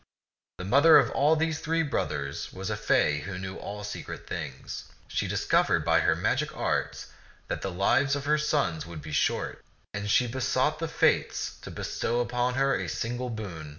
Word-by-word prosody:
The 90 - -6
mother 140 +10 +7
of 145 +5 +3
these 160 0 0
three 165 +1 0
brothers 70 - -3
was 95 0 -5
a - - 0
fay 75 0 +2
who 90 +5 -6
knew 95 0 -6
all 105 0 -6
secret 105 - -6
things. 75 -6 -6 0.2
She - - -1
discovered - - +2
by - - +4
her - - +3
magic - - -1
arts - - -2 0.4
that - - -2
the 95 - -2
lives 130 +10 +2
of 145 0 -4
her 150 +1 +3
sons 140 - 0
would 80 -3 -8
be 80 - -7
short, 75 - 0 0.3
and 100 +1 -3
she 125 - +4
besought 130 +4 0
the 165 - -2
Fates 160 - +1
to - - -8
bestow 120 - -2
upon 125 +1 0
her 135 +1 +2
a - - -3
single 120 +2 -3
boon. 95 -9 -6
120 Hz, 180 wpm, -28 LUFS, 95-145 Hz, 0.4 s, mother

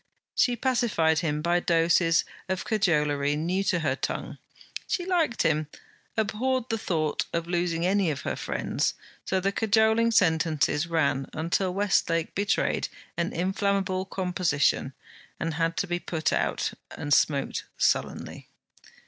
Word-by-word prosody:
She 245 - +2
pacified 225 -11 +2
him 150 -2 -1
by 175 +1 +2
doses 165 0 +3 0.2
of 185 0 -2
cajolery 150 -9 +1
new 175 +6 0
to 180 -3 +1
her 145 -4 +1
tongue. - - -4 0.5
She 355 - -1
liked 335 -10 +1
him, 155 -2 +1 0.5
abhorred 240 +4 0
the 225 - -1
thought 155 -6 -1
of 170 -1 -1
losing 170 -1 -1
any 190 -1 +2
of 140 -3 -3
her - - -3
friends, - - -1 0.3
so 190 - +1
the 195 +2 0
cajoling 220 +2 +3
sentences 160 -6 +2
ran 140 -5 0
until 175 +4 0
Westlake 195 -5 +1
betrayed 200 0 0 0.3
an 170 +1 -1
inflammable 190 +1 0
composition, 180 -8 0 0.5
and 165 0 -2
had 165 +1 -1
to - - +1
be 175 -1 -2
put 160 -2 -1
out, - - 0 0.2
and 145 0 -2
smoked 140 -2 +1
sullenly. - - -1
175 Hz, 135 wpm, -27 LUFS, 160-200 Hz, 0.5 s, doses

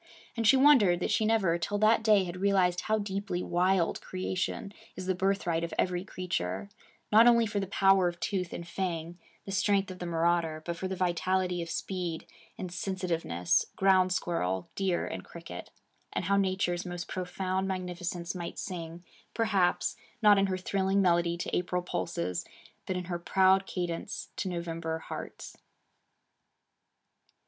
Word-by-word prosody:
And 230 -2 +1
she 265 - +7
wondered 255 -11 +6
that 190 - -1
she 215 +1 +2
never 195 -7 +2
till 205 +5 -1
that 215 +2 +4
day 215 -3 +5
had 175 0 -5
realized 185 -3 +3
how 220 0 +1
deeply 200 -3 -3
wild 180 0 +1
creation 185 +2 -3 0.2
is 185 - -6
the 185 - +1
birthright 185 -3 0
of 170 - -4
every 180 -1 0
creature, 185 +1 -3 0.4
not 225 +3 +8
only 235 -1 +6
for 210 -1 -2
the 195 - -3
power 195 -1 +4
of 175 0 -4
tooth 180 0 -2
and 170 - -6
fang, 170 -1 -3 0.3
the 195 - -6
strength 195 -1 +1
of 180 - -9
the 175 - -4
marauder, 165 -1 +1
but 170 - -2
for 190 +3 -4
the 190 - -3
vitality 180 0 0
of 170 - -5
speed 175 -2 -3 0.3
and 180 -2 -5
sensitiveness, 170 - 0
ground 185 -1 +4
squirrel, 95 - -1
deer, 190 -3 0
and - - -5
cricket; 165 - -9 0.4
and - - -2
how 200 +2 +2
Nature's 190 -2 +1
most 175 -1 -5
profound 185 +1 -2
magnificence 180 -2 -3
might 175 -2 -6
sing, 170 -2 -6 0.3
perhaps, 200 -6 +1 0.2
not 210 -3 +6
in 195 - +3
her 185 -1 -1
thrilling 190 +1 0
melody 170 -1 +2
to 175 - -3
April 180 0 -1
pulses, 90 - -2 0.4
but 185 - -1
in 180 - -3
her 175 -1 -4
proud 190 +2 +3
cadence 175 -2 -4
to 190 - -2
November 165 -2 -3
hearts. 160 - -8
185 Hz, 160 wpm, -30 LUFS, 175-195 Hz, 0.4 s, not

